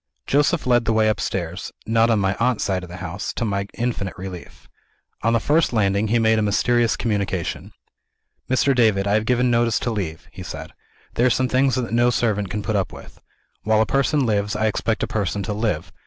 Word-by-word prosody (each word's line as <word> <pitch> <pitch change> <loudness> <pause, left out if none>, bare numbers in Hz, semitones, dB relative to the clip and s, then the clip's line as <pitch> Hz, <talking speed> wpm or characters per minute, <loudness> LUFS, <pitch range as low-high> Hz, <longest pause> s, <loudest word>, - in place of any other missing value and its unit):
Joseph 145 +4 +2
led 120 -2 +3
the 115 - +1
way 110 0 +3
upstairs 95 -3 -3
not 115 +1 +3
on 115 - +3
my 95 -1 +1
aunt's 125 -1 +1
side 95 -2 -1
of 90 - -10
the 90 - -8
house, 90 +4 -4
to 120 - -2
my 100 -2 -2
infinite 115 -5 -3
relief. 90 -2 -9 0.5
On 115 - +2
the 115 - +3
first 150 +3 +2
landing, 100 -1 +1
he 115 +3 +2
made 110 -1 +3
a - - +1
mysterious 115 +3 +2
communication. 100 -6 -2 0.8
"Mr. 130 +1 +2
David, 110 -5 +3
I 100 - +1
have 110 +1 +2
given 125 0 +2
notice 115 -1 +2
to 120 - -1
leave," 90 -7 -4
he - - -10
said. - - -7 0.4
"There 120 - +3
are - - +4
some 130 +2 +1
things 130 0 +2
that 125 -3 -3
no 120 +1 +4
servant 105 -5 0
can 105 +1 -4
put 110 - -1
up 95 -2 0
with. - - -13 0.4
While 110 0 +2
a 110 - +4
person 140 +2 +1
lives, 105 -1 0
I 110 +1 0
expect 110 +1 0
a - - 0
person 100 -1 -2
to 105 - -3
live. 105 -7 -2
110 Hz, 215 wpm, -22 LUFS, 100-120 Hz, 0.8 s, are